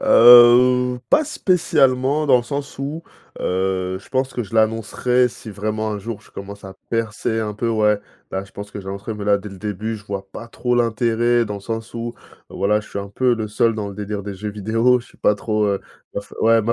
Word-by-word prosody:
Heu, 125 - +7
pas 305 +2 +5
spécialement 150 - +2
dans 130 -3 +6
le - - -3
sens 140 +2 -5
où 150 +4 -4 0.4
heu, 95 0 -1
je - - -18
pense 130 0 -1
que 120 - -2
je 105 +2 -10
l'annoncerai 115 +3 +2
si 110 - -11
vraiment 110 +1 -3
un 105 - -3
jour 110 +1 -6
je - - -21
commence 100 +1 -9
à 95 0 -9
percer 115 0 -1
un 105 -1 -2
peu, 115 +3 -2
ouais. 105 -2 +2 0.3
Bah, 95 0 -2
je 100 - -16
pense 100 0 -8
que 100 - -7
j'annoncerais 100 +3 -6
mais 105 -1 -6
là, 100 -1 +4
dès 100 +1 -8
le 95 - -11
début 105 +2 -4
je 105 - -14
vois 100 -1 -5
pas 115 - -8
trop 125 +1 -1
l'intérêt 120 0 +2
dans 105 -2 -5
le - - -9
sens 115 +1 -5
où 115 0 -5 0.3
voilà, 105 +3 +1
je - - -15
suis - - -5
un 100 0 -5
peu 125 +3 +2
le 110 -2 -4
seul 115 +1 +2
dans 105 -2 -4
le - - -10
délire 105 0 -4
des 100 0 -6
jeux 105 +3 -5
vidéo 115 +5 +2
je 120 - -11
suis - - -22
pas 105 - +3
trop, 105 0 -1
heu 100 -1 0 0.4
heu, - - 0
f - - -21
ouais 115 0 +4
ma 115 +2 +1
110 Hz, 235 wpm, -21 LUFS, 100-120 Hz, 0.4 s, Heu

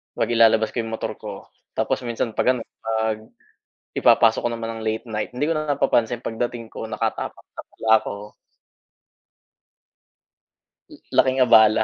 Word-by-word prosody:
pag-ilalabas 115 -2 +3
ko - - -21
'yong 115 0 -6
motor 115 - -3
ko - - -9 0.2
tapos 125 - -1
minsan 115 0 -2
'pag 130 - +4
ano, 120 - -5 0.2
'pag 110 -1 0 0.8
ipapasok 115 -1 +5
ko - - -1
naman 115 -1 -4
ng 110 - -7
late 110 +2 -2
night, 105 -1 -3
hindi 145 - 0
ko - - +2
na 155 0 -3
napapansin 120 -3 +1
pagdating 115 0 -4
ko 110 - -6
nakatapak 110 0 -3
na - - -7
pala - - -9
ako. - - -6 3.0
Laking 130 0 +3
abala. 110 -2 +6
115 Hz, 140 wpm, -23 LUFS, 110-120 Hz, 3.0 s, abala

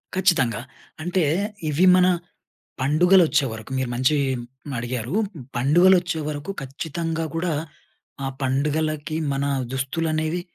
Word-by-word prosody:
ఖచ్చితంగా. 165 - +2 0.4
అంటే, 180 0 +1 0.5
ఇవి 160 +6 +3
మన, 180 0 +5 0.7
పండుగలు 175 +7 +5
వచ్చేవరకు 115 -4 -1
మీరు 130 -2 -1
మంచి 130 +4 +2 0.2
హ్మ్, 130 +4 -10
అడిగారు. 120 +3 -4 0.4
పండుగలు 175 +9 +5
వచ్చేవరకు 155 -1 -4
ఖచ్చితంగా 160 +4 -3
కూడా 165 -1 0 0.7
ఆహ్, 135 0 -3
పండుగలకి 150 +3 -1 0.2
మన 135 +1 -1 0.3
దుస్తులనేవి 155 +5 -1
150 Hz, 100 wpm, -23 LUFS, 135-170 Hz, 0.7 s, మన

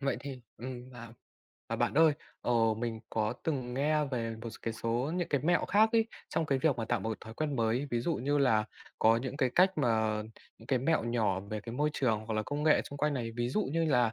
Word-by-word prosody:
Vậy 135 -2 0
thì 135 -2 -7 0.2
ừm, 125 +1 -7
à. 115 -2 -10 0.6
À, - - -2
bạn - - 0
ơi. 160 0 +6 0.3
Ờ, 120 - 0 0.3
mình 115 -2 -3
có 110 -1 0
từng 130 -6 -2
nghe 150 +3 +2
về 115 -4 -3
một 115 - -5
s 110 - -11
cái 115 - -2
số 120 +7 -1
những 175 -2 -1
cái 145 - +1
mẹo 175 +1 +3
khác 215 +3 +5
ấy, 225 -1 +4 0.2
trong 160 - -1
cái 135 -2 +1
việc 140 -1 +2
mà 115 - -2
tạo 115 -1 0
một 110 - -3
cái 110 - -2
thói 110 - -9
quen 145 0 -2
mới. 115 +4 +1
Ví 120 - 0
dụ 165 +7 0
như 145 +4 0
là 115 -6 +3 0.3
có 115 +1 +5
những 130 +3 -4
cái 130 -3 +2
cách 185 +2 +6
mà 110 -4 +1 0.4
những 115 - -15
cái 130 0 +2
mẹo 150 +1 +1
nhỏ 110 -5 +1
về 105 +2 -5
cái 115 +2 -8
môi 150 +3 +1
trường, 110 -7 0
hoặc 110 - -2
là 110 - +1
công 145 +4 -3
nghệ 155 0 +4
chung 140 - -8
quanh 150 +1 +1
này. 120 -4 -3
Ví 120 0 0
dụ 210 +12 +1
như 165 0 +2
là 125 -7 +3
125 Hz, 255 wpm, -31 LUFS, 115-145 Hz, 0.6 s, ơi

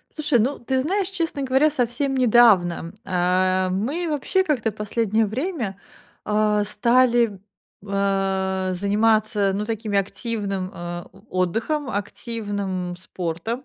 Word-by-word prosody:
Слушай, 300 -5 +2
ну, 265 +6 0
ты 260 +2 -1
знаешь, 385 +4 0
честно 330 -7 -2
говоря, 265 +4 +3
совсем 270 0 -1
недавно, 210 -9 +4
э, 185 0 +2
мы 275 - -1
вообще 375 +6 +1
как-то 245 -9 0
последнее 215 +1 0
время, 240 - -3 0.5
а, 210 0 +2
стали, 235 0 +2 0.4
э, 195 -1 0
заниматься, 210 +1 +2
ну, 210 - -1
такими, 215 -2 -1
активным, 200 -2 -3
э, 175 -1 -6
о - - -18 0.2
отдыхом, 225 - -1
активным 200 -4 -3
спортом. 185 +7 -4
215 Hz, 115 wpm, -23 LUFS, 190-255 Hz, 0.5 s, недавно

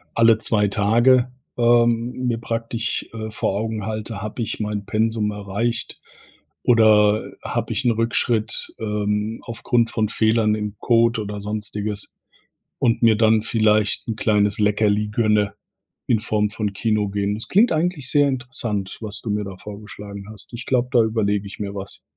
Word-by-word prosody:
alle 115 -1 +5
zwei 105 -2 +1
Tage, 120 +5 +3 0.3
ähm, 120 0 +3 0.2
mir 115 -2 0
praktisch, 115 0 -3
äh, 110 -1 -5
vor 100 -2 -1
Augen 110 -2 -3
halte: 110 -1 -4
„Habe 110 +3 -5
ich 110 - -4
mein 105 -1 -3
Pensum 110 -1 0
erreicht 105 +3 -3 0.6
oder, 110 -2 +4
habe - - -2
ich 135 - -2
'n 120 - +3
Rückschritt, 115 0 +1
ähm, 105 0 -2
aufgrund 115 0 0
von 110 -2 0
Fehlern 110 0 +2
im 105 -1 -4
Code 115 -1 +3
oder 105 0 -5
sonstiges 105 0 -4 0.7
und 115 -1 +2
mir 115 -1 +6
dann 110 0 +4
vielleicht 110 -2 +1
'n 115 - -2
kleines 105 -2 +2
Leckerli 105 0 +2
gönne 105 -2 +1 0.5
in 110 - +3
Form 105 -1 0
von 105 -2 -3
Kino 105 -1 0
gehen. 100 0 -1
Das 110 - -7
klingt 210 +4 +4
eigentlich 160 -4 -1
sehr 145 -1 +4
interessant, 125 -7 -3
was 105 -1 -6
du 115 - -6
mir 105 0 0
da 95 -2 -8
vorgeschlagen 105 -1 -9
hast. 105 -3 -11
Ich 120 +1 -7
glaube, 125 -1 +1
da 120 -4 +5
überlege 105 -2 0
ich 100 - -11
mir 100 -1 -4
was, 100 0 -5
110 Hz, 160 wpm, -22 LUFS, 105-115 Hz, 0.7 s, mir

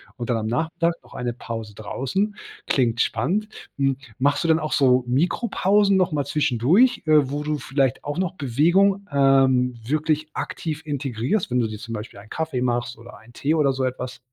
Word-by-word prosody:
und 120 -2 -3
dann 115 - +1
am 110 0 -3
Nachmittag 165 +6 0
noch - - -17
eine 120 -1 -3
Pause 115 -3 -7
draußen. 190 - -2 0.3
Klingt 120 -3 +1
spannend. 180 - 0 0.3
Hm, 135 -1 +2 0.2
machst 140 +5 +1
du - - 0
denn 160 0 +4
auch 155 -1 -3
so 130 -3 +4
Mikropausen 195 - +2
noch 185 -3 +2
mal 145 -2 -1
zwischendurch, 150 - +2
äh, 150 -4 +4
wo 145 +1 -3
du 150 -1 -2
vielleicht 135 -1 0
auch 145 +2 -4
noch 185 -1 -1
Bewegung, 180 - +2
ähm, 135 -2 +3
wirklich 155 +2 0
aktiv 160 -1 -4
integrierst, 140 - -2
wenn 125 - +2
du 115 - +1
dir 110 - -6
zum 115 +2 -8
Beispiel 105 0 -7
einen 105 +2 -14
Kaffee 160 -6 -2
machst 120 -1 -1
oder 120 +2 -13
einen 115 +2 -18
Tee 150 +6 0
oder 145 -4 +3
so 130 0 -2
etwas? 125 0 -4
135 Hz, 190 wpm, -23 LUFS, 125-160 Hz, 0.3 s, denn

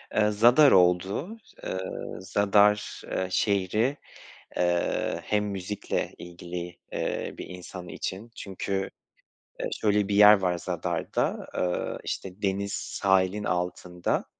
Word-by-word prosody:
Eee, 105 0 +4
Zadar 120 +7 +6
oldu. 95 - +3 0.3
Eee, - - -3 0.4
Zadar, 105 +2 +2
eee, 95 - -1
şehri, 105 +8 +1 0.6
eee, 85 -1 0
hem 105 0 0
müzikle 100 0 -3
ilgili, 85 0 -7
eee, - - -2
bir - - -6
insan 90 0 -9
için. 100 +7 -5
Çünkü, 95 0 -3 0.7
eee, - - -1
şöyle 105 -2 +2
bir 100 - 0
yer 105 +1 +9
var 90 -2 0
Zadar'da, - - -2
eee, 90 -1 -1
işte, 95 +1 -5
deniz 100 0 -1
sahilin 95 +1 +1
altında. 90 -1 -1
95 Hz, 115 wpm, -27 LUFS, 90-105 Hz, 0.7 s, yer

